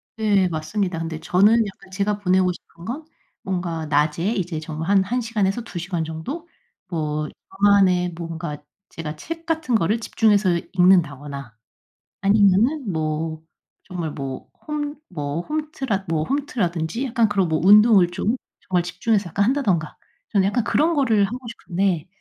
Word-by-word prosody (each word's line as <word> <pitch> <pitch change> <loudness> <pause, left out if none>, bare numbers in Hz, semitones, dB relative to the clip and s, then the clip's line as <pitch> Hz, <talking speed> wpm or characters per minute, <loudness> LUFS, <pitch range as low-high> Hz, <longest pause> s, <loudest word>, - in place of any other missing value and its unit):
네 205 -4 +3
맞습니다. 170 +3 -2
근데 165 -1 -4
저는 205 +8 +4
약간 195 -1 -12
제가 200 +2 0
보내고 185 -2 +3
싶은 170 -1 -13
건 280 +9 -5 0.4
뭔가 175 -4 -2
낮에 150 +5 +1
이제 180 -5 -2
정말 155 +2 -5
한 200 -1 +5
1 245 +6 -1
시간에서 225 -2 0
2 225 - -8
시간 175 -1 -2
정도 160 - -6 0.4
뭐 155 -2 -2 0.3
저만의 190 -3 +4
뭔가 165 -2 -5 0.3
제가 155 -1 -6
책 330 - -7
같은 320 -7 0
거를 215 +3 +2
집중해서 205 -6 +2
읽는다거나 145 - +2 0.7
아니면은 205 +6 +3
뭐 160 0 -2 0.4
정말 175 -4 -4
뭐 135 -2 -6 0.2
홈 295 -1 -2 0.2
뭐 150 -2 -3
홈트라 270 - -3
뭐 160 -2 0
홈트라든지 225 - -1
약간 235 -3 +2
그런 195 -3 +1
뭐 160 -1 +1
운동을 205 -1 +7
좀 210 +6 0 0.3
정말 180 -1 0
집중해서 195 +3 0
약간 200 +5 +1
한다든가. 205 - 0 0.4
저는 195 -3 +3
약간 230 +4 +1
그런 320 +8 +2
거를 230 -8 +3
하고 230 +6 -4
싶은데. 190 -6 -1
190 Hz, 300 characters per minute, -22 LUFS, 165-220 Hz, 0.7 s, 운동을